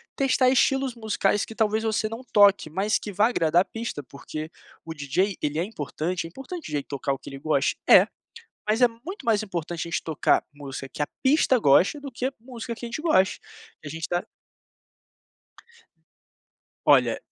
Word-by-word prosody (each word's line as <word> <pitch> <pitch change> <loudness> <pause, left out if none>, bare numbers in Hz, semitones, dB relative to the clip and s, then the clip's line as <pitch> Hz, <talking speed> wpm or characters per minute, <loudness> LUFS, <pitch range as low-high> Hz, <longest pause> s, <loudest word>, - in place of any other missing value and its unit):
testar 265 -1 +2
estilos 265 0 +2
musicais 210 -3 0
que 225 - -8
talvez 220 0 +1
você 220 0 0
não 225 +3 -7
toque, 200 -5 +5
mas 195 +7 +1
que 210 - -7
vá 205 +4 +3
agradar 170 -6 +3
a - - -29
pista, 225 -9 -5
porque, 155 +3 -8 0.4
o 160 - -6
DJ, 165 +7 0
ele 150 +2 -1
é - - +1
importante, 170 -2 -4
é - - -7
importante 270 - -7
o - - -8
DJ 145 -2 -2
tocar 140 -1 -3
o 135 - -2
que - - -10
ele 135 - -8
goste, 140 -1 +1
é, - - +8 0.6
mas 220 +3 +1
é 245 - +6
muito 315 - -9
mais 225 -2 +3
importante 175 -4 -4
a - - -7
gente 170 - -2
tocar 160 -3 +2
música 135 -2 -7
que - - -6
a 145 - 0 0.2
pista 265 -1 +4
goste, 190 - +4
do 275 -2 -7
que 245 +2 -4
a 265 - -1
música 235 0 -7
que 240 - -8
a - - -4
gente 240 - -4
goste, 190 - +2 0.5
a - - -5
gente 160 +1 -5
tá 175 0 -1 2.6
Olha - - +5
205 Hz, 190 wpm, -25 LUFS, 155-235 Hz, 2.6 s, é